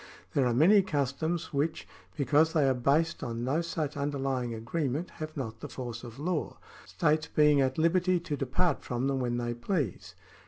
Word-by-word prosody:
There 135 Hz, -3 st, +3 dB
are 120 Hz, -, +1 dB
many 190 Hz, -, +6 dB
customs 160 Hz, 0 st, -2 dB
which, 150 Hz, +3 st, -1 dB, 0.3 s
because 150 Hz, +3 st, +3 dB
they 150 Hz, -4 st, +3 dB
are 135 Hz, -, +4 dB
based 145 Hz, +7 st, +1 dB
on 115 Hz, 0 st, -4 dB
no 140 Hz, +6 st, +1 dB
such 160 Hz, -3 st, -3 dB
underlying 135 Hz, -3 st, -1 dB
agree 120 Hz, +8 st, -2 dB
ment, 150 Hz, +8 st, -3 dB
have 155 Hz, 0 st, -5 dB
not 115 Hz, -5 st, -5 dB
the -, -, -7 dB
force 120 Hz, -2 st, -6 dB
of 120 Hz, -1 st, -9 dB
law, 160 Hz, +2 st, -2 dB, 0.3 s
states 155 Hz, -1 st, +1 dB
being 150 Hz, -2 st, +4 dB
at 130 Hz, -1 st, 0 dB
liberty 180 Hz, +2 st, +3 dB
to 160 Hz, -3 st, -3 dB
depart 140 Hz, +5 st, 0 dB
from 125 Hz, +1 st, -2 dB
them 135 Hz, -1 st, 0 dB
when 120 Hz, -1 st, -1 dB
they 120 Hz, 0 st, -2 dB
please. 120 Hz, -, -3 dB
140 Hz, 185 wpm, -29 LUFS, 125-160 Hz, 0.3 s, many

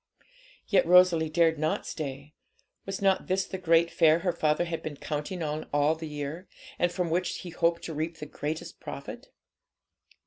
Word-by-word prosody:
Yet 195 Hz, -5 st, +3 dB
Rosalie 175 Hz, -3 st, +6 dB
dared 160 Hz, -1 st, +3 dB
not 155 Hz, +1 st, -1 dB
stay. 140 Hz, 0 st, -6 dB, 0.5 s
Was 195 Hz, 0 st, -4 dB
not 195 Hz, -1 st, +2 dB
this 190 Hz, +1 st, +1 dB
the 190 Hz, -, -6 dB
great 170 Hz, -1 st, +3 dB
fair 160 Hz, -2 st, +5 dB
her 180 Hz, -, +2 dB
father 155 Hz, +2 st, +1 dB
had 170 Hz, -1 st, -4 dB
been 150 Hz, -2 st, -6 dB
counting 155 Hz, +5 st, -4 dB
on 155 Hz, 0 st, -3 dB
all 145 Hz, +2 st, +3 dB
the 160 Hz, 0 st, -7 dB
year, 150 Hz, +4 st, -5 dB, 0.3 s
and 175 Hz, -, +2 dB
from 175 Hz, -2 st, -2 dB
which 180 Hz, +2 st, 0 dB
he 180 Hz, -, -8 dB
hoped 170 Hz, 0 st, +1 dB
to 165 Hz, -, -5 dB
reap 160 Hz, +2 st, -3 dB
the 150 Hz, -, -7 dB
greatest 150 Hz, +2 st, -5 dB
profit? -, -, -8 dB
165 Hz, 175 wpm, -28 LUFS, 155-175 Hz, 0.5 s, Rosalie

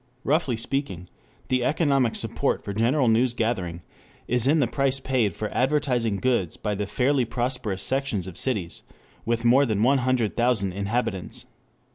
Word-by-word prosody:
Roughly 140 Hz, -5 st, +1 dB
speaking, 115 Hz, -, -3 dB, 0.4 s
the 130 Hz, -1 st, +1 dB
economic 135 Hz, -4 st, +1 dB
support -, -, -1 dB
for 100 Hz, -, -4 dB
general 120 Hz, +6 st, +2 dB
news 120 Hz, +2 st, +2 dB
gathering 95 Hz, -8 st, -2 dB, 0.4 s
is 125 Hz, +1 st, +1 dB
in 155 Hz, +3 st, +4 dB
the 140 Hz, -, +3 dB
price 135 Hz, +2 st, 0 dB
paid 125 Hz, -8 st, 0 dB
for 105 Hz, -, -4 dB
advertised 125 Hz, -7 st, +1 dB
goods 120 Hz, -10 st, 0 dB
by 105 Hz, -, -2 dB
the 100 Hz, 0 st, -3 dB
fairly 130 Hz, +4 st, +1 dB
prosperous 120 Hz, -5 st, -2 dB
sections 130 Hz, -7 st, 0 dB
of 95 Hz, -3 st, -8 dB
cities 100 Hz, -6 st, -1 dB, 0.4 s
with 115 Hz, +1 st, -1 dB
more 130 Hz, +4 st, +6 dB
than 110 Hz, -2 st, 0 dB
one 135 Hz, +3 st, +4 dB
hundred 125 Hz, -4 st, 0 dB
thousand 120 Hz, -5 st, +1 dB
inhabitants. 100 Hz, +1 st, -3 dB
120 Hz, 155 wpm, -25 LUFS, 105-130 Hz, 0.4 s, more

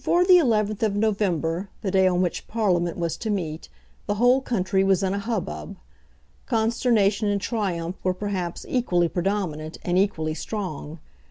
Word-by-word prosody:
Before 355 Hz, +1 st, +3 dB
the 365 Hz, -1 st, +8 dB
11th 215 Hz, -, +1 dB
of 215 Hz, -3 st, +1 dB
November, 195 Hz, -4 st, 0 dB
the 195 Hz, -, -1 dB
day 190 Hz, -1 st, +4 dB
on 180 Hz, 0 st, +2 dB
which 175 Hz, -, -3 dB
Parliament 180 Hz, -7 st, 0 dB
was 170 Hz, -2 st, -1 dB
to 225 Hz, -, -4 dB
meet, 165 Hz, -6 st, -3 dB, 0.4 s
the 205 Hz, -, 0 dB
whole 245 Hz, +4 st, +4 dB
country 190 Hz, -6 st, 0 dB
was 195 Hz, 0 st, +2 dB
in 190 Hz, 0 st, +1 dB
a 200 Hz, -, -1 dB
hubbub. 200 Hz, -2 st, -4 dB, 0.7 s
Consternation 220 Hz, -3 st, +2 dB
and 205 Hz, 0 st, +1 dB
triumph 185 Hz, -6 st, -2 dB
were 185 Hz, 0 st, +1 dB
perhaps 185 Hz, -3 st, -4 dB
equally 180 Hz, -9 st, +1 dB
predominant, 170 Hz, -3 st, -2 dB
and 180 Hz, +1 st, +1 dB
equally 160 Hz, -6 st, 0 dB
strong. 160 Hz, -3 st, -5 dB
195 Hz, 160 wpm, -24 LUFS, 175-215 Hz, 0.7 s, the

